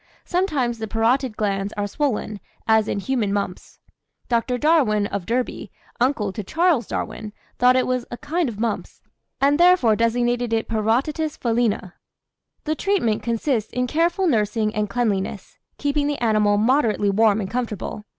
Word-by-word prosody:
Sometimes 290 - 0
the 220 - -4
parotid 230 +2 +1
glands 200 -1 -1
are 205 0 -2
swollen, 215 -3 -2 0.3
as 220 -1 +4
in - - -1
human 220 -1 -1
mumps. 200 -3 -4 0.5
Dr. 245 +1 +1
Darwin, 250 -9 +3
of 200 -3 -4
Derby, 245 +2 -2 0.3
uncle 235 -6 +1
to 210 - -5
Charles 320 - +1
Darwin, 215 -1 -5 0.3
thought 250 +1 +5
it 255 - +2
was 255 -1 -1
a 240 - -6
kind 305 +1 -1
of 210 -3 -8
mumps, 230 -1 -3 0.4
and 285 +2 +3
therefore 350 -11 +5
designated 240 +1 0
it 225 - 0
Parotitis 255 +8 0
felina. 230 -6 0 0.7
"The 310 - -1
treatment 315 - 0
consists 230 -1 -1
in 250 0 -1
careful 340 +7 +1
nursing 215 - +1
and 210 -1 -1
cleanliness, 205 -4 -2 0.2
keeping 290 0 0
the 290 -1 -1
animal 215 -3 +2
moderately 220 -3 +2
warm 215 +1 +3
and 195 - -3
comfortable. 225 -3 -4
235 Hz, 150 wpm, -22 LUFS, 210-275 Hz, 0.7 s, thought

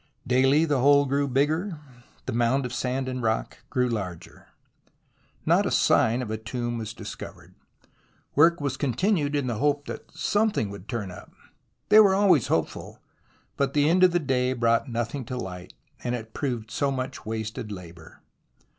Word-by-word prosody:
Daily 135 +5 +4
the 145 -4 +1
hole 140 +2 +5
grew 140 +1 0
bigger, 155 +7 0 0.5
the - - -3
mound 120 +3 +1
of 125 - -5
sand 130 +1 -2
and 130 -1 -3
rock 110 -1 -1
grew 125 -2 +1
larger. 95 -8 -6 1.0
Not - - +3
a - - 0
sign 120 +3 +3
of 110 - -6
a 110 - -2
tomb 120 +1 -4
was 110 -1 -5
discovered. - - -9 0.8
Work 165 +4 +5
was 140 -2 -2
continued 145 - 0
in 145 -2 0
the 120 -4 -2
hope 145 0 +1
that - - -8
something 205 - 0
would 100 0 -10
turn 110 -7 -3
up. - - -12 0.6
They 215 - +8
were 200 -3 +6
always 190 - +4
hopeful, 80 - -2 0.6
but 140 0 0
the 145 0 +4
end 180 +3 +4
of 185 - +7
the 175 - +2
day 130 -5 0
brought 115 +1 +1
nothing 120 +3 -3
to 125 +2 -5
light 90 -6 -7 0.3
and 125 0 -1
it 110 -2 -8
proved 120 -6 -3
so 140 +4 0
much 130 0 -4
wasted 110 +1 -5
labour. 85 -4 -11
130 Hz, 170 wpm, -26 LUFS, 115-145 Hz, 1.0 s, They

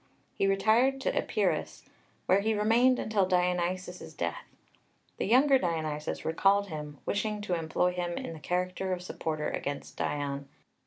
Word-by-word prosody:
He 195 - +1
retired 220 +7 +3
to - - 0
Epirus, - - -1 0.4
where 190 - +4
he 220 +2 +1
remained 235 +5 +4
until 205 -3 +1
Dionysius's 180 0 -1
death. - - -3 0.7
The - - -1
younger 265 +4 +5
Dionysius 155 -5 -2
recalled 195 +5 +3
him, 150 -2 -6
wishing 210 +1 -1
to 205 -3 -2
employ 165 +2 +1
him 175 -1 -3
in 165 - -5
the 160 - -9
character 180 +3 -1
of 180 0 -4
supporter 155 -3 -3
against 140 0 -5
Dion. 140 -1 -2
180 Hz, 145 wpm, -30 LUFS, 160-210 Hz, 0.7 s, younger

